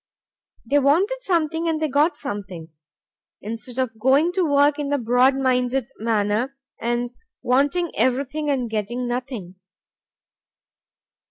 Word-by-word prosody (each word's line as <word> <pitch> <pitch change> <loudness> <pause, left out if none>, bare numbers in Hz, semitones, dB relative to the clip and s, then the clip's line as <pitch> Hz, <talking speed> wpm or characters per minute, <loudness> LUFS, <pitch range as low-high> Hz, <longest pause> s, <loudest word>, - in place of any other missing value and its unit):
They 285 +5 +3
wanted 350 - +2
something 330 -5 0
and 315 -1 0
they 310 - 0
got 295 +4 +2
something; 190 - -6 0.7
instead 230 +3 -7
of 240 -4 -2
going 275 +8 +4
to 370 0 0
work 285 -1 +3
in 285 -1 -2
the 285 - +1
broad 250 +2 +3
minded 255 -1 0
manner 220 +4 0 0.3
and 240 +1 -1 0.3
wanting 285 +7 +1
everything 275 +4 0
and 260 -4 0
getting 225 +3 -3
nothing. 240 -7 -5
260 Hz, 120 wpm, -23 LUFS, 235-290 Hz, 0.7 s, going